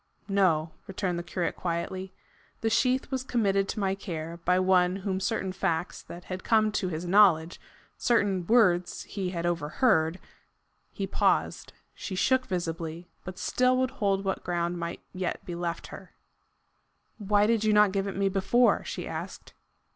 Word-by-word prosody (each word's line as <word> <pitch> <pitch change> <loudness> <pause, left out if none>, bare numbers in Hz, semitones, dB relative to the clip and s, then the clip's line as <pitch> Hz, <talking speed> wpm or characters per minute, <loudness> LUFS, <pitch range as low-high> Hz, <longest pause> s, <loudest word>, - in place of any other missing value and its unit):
"No," 175 -6 +2 0.2
returned 185 -2 -2
the - - -5
curate 175 0 -2
quietly. 185 +2 -3 0.5
"The 225 - 0
sheath 255 +4 +1
was 260 -1 -1
committed 200 -6 +1
to - - -3
my 195 -1 +1
care 170 -4 -6
by 180 +1 +4
one 185 -1 +3
whom 190 -1 -2
certain 190 -1 -1
facts 180 -2 -2
that 175 +1 -10
had 185 0 -6
come 215 -1 +3
to 205 -2 -1
his 165 +1 -4
knowledge 175 -3 +4 0.4
certain 200 -7 +1
words 180 -7 +3
he 190 -3 -4
had 170 -2 -3
overheard 170 - +1 0.4
" - - -46 0.3
He - - -3
paused. - - 0 0.2
She 190 - -6
shook 255 +7 +2
visibly, 170 -2 -4
but 185 0 -8
still 255 +5 +2
would 255 -1 +1
hold 195 -2 0
what 190 - -2
ground 175 0 -1
might 170 0 -5
yet 185 -1 -3
be 175 - -5
left 170 -1 -3
her. - - -11 1.0
"Why 205 0 +3
did 225 0 +2
you 215 - +3
not 210 -1 +5
give 195 0 -1
it 195 - -5
me 195 0 +2
before?" 195 +6 +3
she - - -5
asked. - - -7
190 Hz, 165 wpm, -28 LUFS, 175-210 Hz, 1.0 s, not